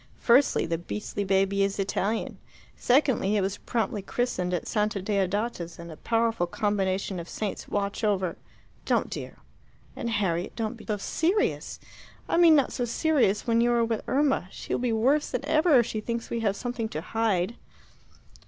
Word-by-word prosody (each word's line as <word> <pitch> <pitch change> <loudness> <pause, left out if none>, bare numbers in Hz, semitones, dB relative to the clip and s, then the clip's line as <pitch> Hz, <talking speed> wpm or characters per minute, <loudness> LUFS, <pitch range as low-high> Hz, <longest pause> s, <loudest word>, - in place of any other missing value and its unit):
Firstly, 255 +4 +4
the 165 0 -2
beastly 205 +3 -4
baby 195 0 +2
is 195 0 +1
Italian. 200 +2 -1 0.4
Secondly, 250 -6 +2
it - - +2
was 195 +1 -2
promptly 220 -3 -2
christened 190 -4 -2
at 180 - -2
Santa 210 -1 0
Deodata's, 195 -2 -1
and 170 0 -9
a - - -8
powerful 225 -2 0
combination 195 -1 -1
of 170 - -8
saints 210 -3 -4
watch 200 +2 -2
over 190 -4 +1 0.3
" - - -32
"Don't, - - +1
dear. - - -6 0.6
And, 235 - -3
Harriet, 190 -5 -1
don't 225 -1 -2
be 230 -3 -14
so 210 -2 0
serious 345 - 0 0.5
I - - +1
mean 335 -2 +7
not 280 -3 +2
so 245 - -2
serious 240 - +1
when 230 -1 +3
you 240 0 +3
are 235 -1 +3
with 225 -1 -2
Irma. 270 -9 +1
She - - -6
will - - +1
be 250 -2 +1
worse 260 +7 +2
than 280 - -3
ever 310 0 +4
if 235 - +4
she 215 -2 -3
thinks 235 +1 -4
we 235 - -1
have 205 -3 0
something 240 -1 -3
to 155 - -4
hide." 215 0 0
215 Hz, 180 wpm, -27 LUFS, 195-240 Hz, 0.6 s, mean